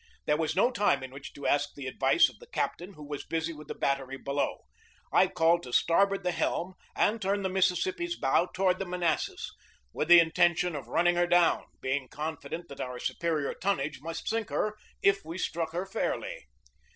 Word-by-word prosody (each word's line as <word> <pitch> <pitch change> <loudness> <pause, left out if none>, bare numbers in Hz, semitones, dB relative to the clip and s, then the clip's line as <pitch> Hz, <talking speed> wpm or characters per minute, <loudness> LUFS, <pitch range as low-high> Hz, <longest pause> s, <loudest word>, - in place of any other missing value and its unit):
There 150 - +3
was 160 0 -1
no 235 +7 +4
time 205 - +2
in 130 - -7
which 135 +1 -9
to 140 - -9
ask 145 0 +1
the 140 - -7
advice 135 +1 +4
of - - -13
the 475 - -14
cap - - -1
tain, 180 +4 -9
who 150 -4 -11
was 145 -1 -5
busy 165 0 -2
with 150 -1 -11
the - - -5
battery 135 -1 -1
below. 140 +1 -2 0.5
I - - +6
called 165 +1 +3
to 125 - -9
starboard 195 +7 +3
the 180 - +1
helm 175 +1 -1 0.2
and 220 +2 +2
turned 195 +1 0
the - - +1
Mississippi's 190 - +1
bow 165 +6 +2
toward 185 -1 +1
the 195 - -2
Manassas, 175 -2 -1 0.4
with 150 - -1
the 175 0 +10
intention 175 +1 +3
of 135 -5 -6
run 165 +8 +1
ning 175 0 +4
her 175 0 +3
down, 175 -1 +3 0.2
being 130 0 -1
confident 160 +3 -5
that 140 - -8
our 125 -1 -4
superior 155 0 -1
tonnage 150 -8 -1
must 165 +1 -6
sink 225 -1 -1
her 215 0 -1 0.3
if 200 0 +3
we 165 +3 -6
struck 165 -3 -2
her 175 +3 -2
fairly. - - -3
170 Hz, 200 wpm, -29 LUFS, 145-190 Hz, 0.5 s, the